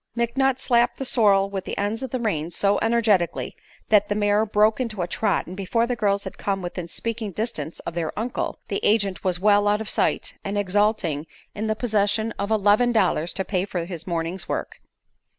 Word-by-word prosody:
McNutt 255 +3 +1
slapped 240 -2 +2
the 270 - -3
sorrel 200 -5 +3
with 195 -2 -4
the - - -5
ends 210 +4 -1
of 265 - -4
the 255 - -2
reins 170 -7 -2
so 200 0 +2
energetically 220 -7 +1 0.3
that 210 -1 +4
the 205 - 0
mare 205 +1 +2
broke 215 +2 +3
into 215 -7 -2
a - - -3
trot, 215 +5 0
and 180 - -8
before 200 +4 0
the 245 0 -1
girls 200 -3 +1
had 190 - -8
come 195 -2 -2
within 175 -1 -5
speaking 230 +4 -3
distance 175 -7 -4
of - - -6
their 165 -2 -2
uncle, 235 +3 -2
the 200 - -1
agent 200 -4 +1
was 180 -2 +1
well 205 +1 +4
out 205 +1 +3
of 220 - -5
sight - - 0
and 200 +1 -3
exulting 200 -6 +1 0.3
in 215 +2 -3
the 220 - 0
possession 220 -1 0
of 200 +1 -2
eleven 215 +3 +3
dollars 180 -7 +1
to 190 - -3
pay 185 -2 0
for 180 -4 -3
his 170 -2 -7
morning's 170 +1 -3
work. - - -4
205 Hz, 205 wpm, -24 LUFS, 185-225 Hz, 0.3 s, that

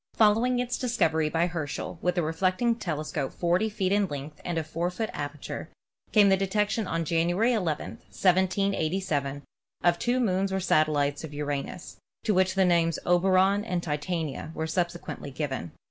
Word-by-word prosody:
Following 225 +4 +4
its 245 0 -1
discovery 160 -11 +1
by 165 +2 +2
Herschel, 165 -1 -4
with 180 0 0
a 175 - +2
reflecting 185 +9 +1
telescope 155 - -3
40 175 +5 +1
feet 195 -3 -1
in 200 -1 +3
length 145 0 -7
and 175 -2 -2
of 160 - -1
4 165 +3 -2
foot 220 +5 -3
aperture, 145 +1 -5 0.4
came 205 -2 +6
the 195 - +6
detection 205 +2 0
on 165 -1 -1
January 175 +9 +2
11, 170 -9 -2
1787, 185 -6 +1 0.4
of 175 -1 +3
two 245 +1 +1
moons 195 -4 +1
or 190 - 0
satel 155 -4 +2
lites 145 +1 0
of 150 -2 -7
Uranus, 145 +4 -4 0.3
to 215 - +2
which 185 0 +2
the 190 -1 +4
names 170 -2 +3
of 175 - +1
Oberon 195 +2 +4
and 180 -5 -2
Titania 155 -1 -3
were 160 - -2
subsequently 175 -3 -3
given. 135 - -4
175 Hz, 165 wpm, -27 LUFS, 155-195 Hz, 0.4 s, came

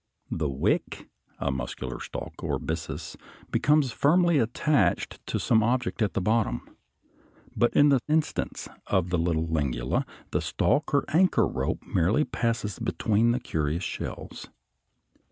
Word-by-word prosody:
The 80 -3 -1
"wick," 65 0 -1 0.3
a 70 - -1
muscular 65 -1 -5
stalk - - -7
or - - 0
byssus, 80 0 -5 0.4
becomes 150 -3 +3
firmly 170 +5 +3
attached 115 -4 +1
to - - -1
some 110 -1 +3
object 120 +1 0
at 105 - +1
the - - +2
bottom. 110 +3 0 0.9
But 120 - +3
in 145 0 +6
the 135 -2 +4
instance 155 0 -1 0.2
of 90 -2 +1
the 90 - +1
little 80 -1 +1
Lingula 70 -6 -1 0.2
the - - 0
stalk 145 +4 +1
or 140 - +2
anchor 180 +5 +4
rope - - -2
merely 95 - +2
passes 115 -5 -2
between 110 +2 +1
the 120 +2 +2
curious 80 -6 -2
shells. - - -6
110 Hz, 135 wpm, -27 LUFS, -, 0.9 s, in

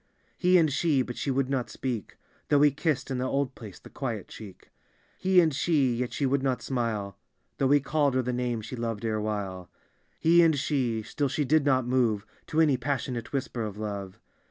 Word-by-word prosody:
He 180 0 +4
and 160 -5 +3
she; 145 -3 +2
but 125 - -7
she - - -3
would 135 0 +1
not 130 -3 -1
speak. 125 -5 -4 0.3
Though 145 - +5
be 145 0 +5
kissed, 145 -1 -1
in 130 - -1
the 130 - -1
old 140 -1 0
place, 105 -8 -10
the - - -15
quiet 115 -7 -4
cheek. 100 -5 -12 0.5
He 185 -1 +4
and 160 -4 +3
she; 140 -3 +2
yet 125 +1 -2
she 140 - -1
would 135 +1 +1
not 130 -2 -1
smile. 110 -6 -2 0.4
Though 135 - +2
he 145 +1 +6
called 140 -1 +1
her 130 - +2
the 125 +1 -2
name 120 -2 -1
she 110 +4 -7
loved 115 -2 -3
erewhile. 105 -4 -3 0.5
He 170 +2 +5
and 160 -3 +4
she; 125 -6 0
still 140 +5 -2
she 145 +2 -1
did 150 +2 +3
not 130 -3 +3
move 120 -5 +1 0.2
To 160 - -1
any 150 -5 +4
passionate 125 -2 -3
whisper 130 -3 -3
of 105 -2 -4
love. 100 -3 -5
130 Hz, 205 wpm, -27 LUFS, 115-145 Hz, 0.5 s, he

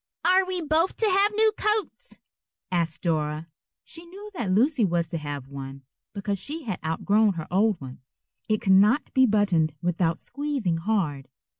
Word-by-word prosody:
"Are 370 +1 +5
we 365 -2 -2
both 320 +4 +1
to 450 - +2
have 400 +1 +3
new 440 0 +4
coats?" 430 +4 -2 0.5
asked 170 -3 -1
Dora. 155 -1 -1 0.3
She 330 - -8
knew 395 +5 -11
that 235 - -3
Lucy 250 +6 +3
was 170 -3 0
to 165 - -2
have 145 -3 -6
one, 135 0 -8 0.3
because 200 -1 -2
she 305 - -6
had 210 -8 -4
outgrown 200 +6 +2
her 160 -3 -5
old 200 0 +2
one. 130 -2 -10 0.5
It 215 -1 +1
could 190 - +3
not 210 +9 +4
be 260 -1 +5
buttoned 185 -8 +2
without 170 0 0
squeezing 275 - -2
hard. 165 -8 -1
200 Hz, 165 wpm, -25 LUFS, -, 0.5 s, Are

